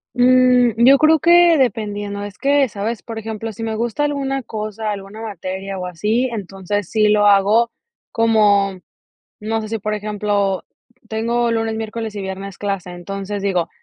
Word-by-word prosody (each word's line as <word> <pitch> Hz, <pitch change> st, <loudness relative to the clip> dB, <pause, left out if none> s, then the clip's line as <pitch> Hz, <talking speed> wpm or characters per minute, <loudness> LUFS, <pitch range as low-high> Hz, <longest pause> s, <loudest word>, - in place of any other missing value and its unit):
Mm, 250 Hz, -1 st, +5 dB
yo 275 Hz, +2 st, +8 dB
creo 310 Hz, +2 st, +4 dB
que 345 Hz, +1 st, +6 dB
dependiendo. 205 Hz, -5 st, -1 dB
Es 205 Hz, 0 st, -8 dB
que 280 Hz, 0 st, +3 dB
sabes, 215 Hz, +2 st, -4 dB
por 225 Hz, -1 st, -6 dB
ejemplo, 220 Hz, 0 st, -5 dB
si 225 Hz, -, -7 dB
me 220 Hz, -1 st, -2 dB
gusta 240 Hz, +6 st, -1 dB
alguna 270 Hz, -2 st, -2 dB
cosa, 215 Hz, -2 st, -4 dB
alguna 200 Hz, +2 st, -7 dB
materia 195 Hz, -2 st, -5 dB
o 180 Hz, -, -4 dB
así, 215 Hz, +8 st, 0 dB
entonces 195 Hz, -2 st, -4 dB
sí 215 Hz, -1 st, +2 dB
lo 210 Hz, 0 st, +4 dB
hago 205 Hz, +4 st, +4 dB, 0.4 s
como, 205 Hz, -4 st, +3 dB, 0.6 s
no 225 Hz, +1 st, -2 dB
sé, 215 Hz, -, -6 dB
si 225 Hz, 0 st, -3 dB
por 210 Hz, +1 st, -2 dB
ejemplo, 205 Hz, -2 st, -1 dB, 0.4 s
tengo 235 Hz, +2 st, 0 dB
lunes, 225 Hz, -1 st, -1 dB
miércoles 220 Hz, 0 st, -5 dB
y -, -, -3 dB
viernes 190 Hz, 0 st, -6 dB
clase, 195 Hz, -3 st, -3 dB
entonces 195 Hz, +3 st, -5 dB
digo: 180 Hz, -4 st, 0 dB
215 Hz, 160 wpm, -19 LUFS, 200-230 Hz, 0.6 s, yo